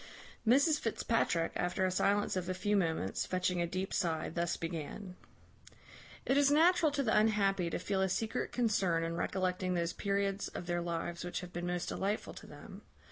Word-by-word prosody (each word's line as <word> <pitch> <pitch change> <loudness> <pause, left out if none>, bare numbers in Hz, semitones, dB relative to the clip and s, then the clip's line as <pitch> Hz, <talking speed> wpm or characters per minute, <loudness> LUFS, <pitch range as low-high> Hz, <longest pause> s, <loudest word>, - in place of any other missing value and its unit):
Mrs 285 +5 +5
Fitzpatrick, 220 -7 0
after 180 +1 0
a 185 - +1
silence 200 +2 +1
of 185 -1 -2
a 185 - -1
few 205 +3 0
moments, 160 - 0
fetching 180 -1 0
a 170 - 0
deep 185 +2 -3
sigh, 165 -4 0
thus 170 0 -1
began: 170 +3 -5 1.1
"It 270 - +2
is 285 -1 +5
natural 320 +1 +4
to 280 -1 0
the 220 - +2
unhappy 200 -4 +2
to - - -2
feel 190 +1 -1
a 190 - +2
secret 220 +4 -2
concern 195 -8 +1
in 165 0 -2
recollecting 185 0 -1
those 170 0 -1
periods 200 0 -1
of - - -7
their 175 0 -1
lives 170 0 -3
which 175 0 -4
have 180 -1 -9
been 175 +1 -3
most 175 0 -2
delightful 200 +2 -2
to - - -11
them. - - -11
185 Hz, 185 wpm, -33 LUFS, 175-210 Hz, 1.1 s, Mrs